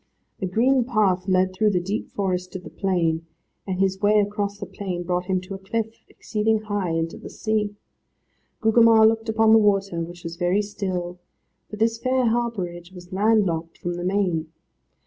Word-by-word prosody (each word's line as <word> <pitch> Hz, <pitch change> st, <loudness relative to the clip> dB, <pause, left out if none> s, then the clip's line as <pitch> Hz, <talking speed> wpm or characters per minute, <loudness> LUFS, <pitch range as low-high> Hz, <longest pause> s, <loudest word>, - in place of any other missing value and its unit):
A 190 Hz, -, 0 dB
green 250 Hz, +7 st, +3 dB
path 205 Hz, -6 st, +1 dB
led 185 Hz, 0 st, +2 dB
through 215 Hz, +3 st, +2 dB
the 185 Hz, -3 st, +1 dB
deep 195 Hz, +5 st, -3 dB
forest 185 Hz, -2 st, -2 dB
to 185 Hz, -, -4 dB
the -, -, -11 dB
plain, 165 Hz, -4 st, 0 dB, 0.4 s
and 185 Hz, -1 st, -2 dB
his 190 Hz, 0 st, +1 dB
way 210 Hz, +1 st, +4 dB
across 205 Hz, 0 st, -1 dB
the 200 Hz, -, -6 dB
plain 185 Hz, -4 st, -5 dB
brought 180 Hz, 0 st, -1 dB
him 190 Hz, -1 st, +1 dB
to 185 Hz, +2 st, -8 dB
a 195 Hz, -, -6 dB
cliff, 225 Hz, +3 st, -4 dB
exceeding 215 Hz, 0 st, -1 dB
high, 205 Hz, -4 st, -2 dB
and 165 Hz, 0 st, 0 dB
to -, -, -10 dB
the -, -, -9 dB
sea. 215 Hz, -2 st, -1 dB, 0.9 s
Gugemar 225 Hz, 0 st, +6 dB
looked 225 Hz, 0 st, 0 dB
upon 220 Hz, 0 st, +4 dB
the 225 Hz, -, +8 dB
water, 195 Hz, -4 st, +1 dB
which 175 Hz, +1 st, -7 dB
was 165 Hz, 0 st, -6 dB
very 180 Hz, +4 st, +1 dB
still, 180 Hz, -3 st, -4 dB, 0.5 s
for -, -, -6 dB
this 225 Hz, +1 st, +1 dB
fair 255 Hz, 0 st, +1 dB
harbourage 195 Hz, -7 st, -2 dB
was 180 Hz, -1 st, -12 dB
land 210 Hz, +2 st, +3 dB
locked 165 Hz, -1 st, -3 dB
from 175 Hz, -, -3 dB
the 175 Hz, 0 st, -5 dB
main. 180 Hz, -4 st, 0 dB
195 Hz, 185 wpm, -24 LUFS, 180-220 Hz, 0.9 s, the